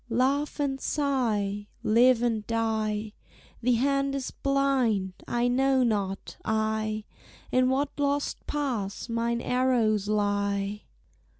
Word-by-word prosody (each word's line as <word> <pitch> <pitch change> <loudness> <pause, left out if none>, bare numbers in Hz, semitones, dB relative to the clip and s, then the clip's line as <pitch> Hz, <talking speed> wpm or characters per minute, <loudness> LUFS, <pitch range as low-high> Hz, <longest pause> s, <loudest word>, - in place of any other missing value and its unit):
"Laugh 275 +6 +1
and 270 -2 -1
sigh, 215 -8 0 0.2
live 240 +2 +4
and 225 -3 0
die, 220 -2 -1 0.5
The 245 +1 +3
hand 275 +3 +1
is 270 -2 -3
blind: 260 -9 +1
I 240 0 +1
know 265 +1 +3
not, 200 -4 -2
I, 215 0 -1 0.5
In 255 0 +3
what 280 +2 0
lost 285 0 -1
pass 245 -11 -2
mine 235 +1 0
arrows 235 -6 +1
lie! 205 -1 0
235 Hz, 110 wpm, -27 LUFS, 215-270 Hz, 0.5 s, live